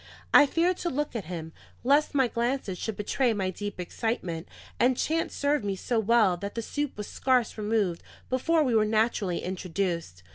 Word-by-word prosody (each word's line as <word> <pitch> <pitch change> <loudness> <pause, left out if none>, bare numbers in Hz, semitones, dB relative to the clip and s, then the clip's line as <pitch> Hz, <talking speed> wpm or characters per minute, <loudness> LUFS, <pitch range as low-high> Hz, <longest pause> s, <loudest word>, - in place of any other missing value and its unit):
I 290 - +8
feared 345 +4 +1
to 345 - -2
look 295 -2 -2
at 220 - -3
him, 160 -2 -6 0.3
lest 285 +4 +3
my 265 -3 +4
glances 235 -5 -2
should 220 -3 -4
betray 235 +4 +1
my 190 -3 -1
deep 205 +1 -6
excitement, 180 -3 -3 0.3
and 250 +1 +3
chance 325 +1 -1
served 285 -2 +1
me 200 -1 -1
so 230 +4 -1
well 220 -4 +3
that 200 +3 -6
the 230 - -2
soup 290 +2 -3
was 210 - -4
scarce 255 -1 +1
removed 210 -5 0 0.3
before 310 +5 +2
we 255 -4 +1
were 220 -1 +5
naturally 215 -4 +1
introduced. 175 - -3
220 Hz, 180 wpm, -28 LUFS, 190-260 Hz, 0.3 s, I